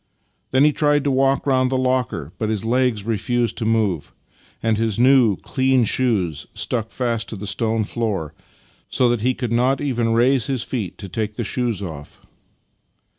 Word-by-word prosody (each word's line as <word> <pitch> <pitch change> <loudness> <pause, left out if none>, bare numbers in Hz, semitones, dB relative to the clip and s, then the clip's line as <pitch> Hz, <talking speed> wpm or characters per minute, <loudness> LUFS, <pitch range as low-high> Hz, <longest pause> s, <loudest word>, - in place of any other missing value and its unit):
Then 130 +2 +3
he 150 0 +4
tried 145 -1 +2
to 145 - +1
walk 135 +1 +2
round 130 -2 +2
the 130 - 0
locker, 125 - -1
but 110 - -1
his 110 -1 -2
legs 120 -3 +1
refused 115 +1 -1
to 115 - -2
move, 105 -9 0 0.5
and 110 -1 +2
his 110 -1 0
new, 125 -4 +5
clean 130 -1 +1
shoes 100 - 0
stuck 115 -2 -2
fast 115 -3 -2
to - - -5
the 100 +1 -7
stone 110 +3 0
floor, 100 -9 -3 0.6
so 125 - +2
that 120 -2 0
he 125 +2 +1
could 125 -3 -4
not 125 +3 +2
even 120 -5 0
raise 125 +1 +3
his 130 -4 -1
feet 105 -9 -4
to 100 - -7
take 105 +2 -3
the 120 - -3
shoes 115 -2 -1
off. 75 -5 -8
115 Hz, 180 wpm, -21 LUFS, 105-130 Hz, 0.6 s, new